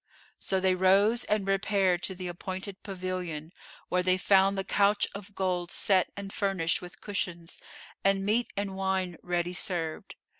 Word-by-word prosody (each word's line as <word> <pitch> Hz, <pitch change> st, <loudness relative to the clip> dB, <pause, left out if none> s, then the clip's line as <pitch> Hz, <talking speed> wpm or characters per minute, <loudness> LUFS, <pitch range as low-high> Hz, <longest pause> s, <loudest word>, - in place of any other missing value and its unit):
So 190 Hz, -, 0 dB
they 185 Hz, 0 st, +3 dB
rose 195 Hz, +6 st, +4 dB
and 210 Hz, -2 st, 0 dB
repaired 195 Hz, -2 st, +2 dB
to 190 Hz, -, -2 dB
the 180 Hz, 0 st, -7 dB
appointed 185 Hz, +2 st, -5 dB
pavilion, 180 Hz, -4 st, -5 dB, 0.3 s
where 180 Hz, -, +1 dB
they 185 Hz, 0 st, +3 dB
found 195 Hz, +1 st, +4 dB
the 195 Hz, -, 0 dB
couch 200 Hz, +1 st, +3 dB
of 200 Hz, 0 st, -9 dB
gold 180 Hz, -2 st, -1 dB
set 190 Hz, -1 st, +2 dB
and 195 Hz, -1 st, -6 dB
furnished 190 Hz, -5 st, 0 dB
with 180 Hz, -1 st, -11 dB
cushions, 175 Hz, -4 st, -4 dB, 0.4 s
and 195 Hz, 0 st, +2 dB
meat 225 Hz, +4 st, +1 dB
and 200 Hz, -1 st, -2 dB
wine 190 Hz, -2 st, -1 dB
ready 175 Hz, 0 st, -1 dB
served. 170 Hz, -4 st, -2 dB
190 Hz, 155 wpm, -29 LUFS, 180-195 Hz, 0.4 s, rose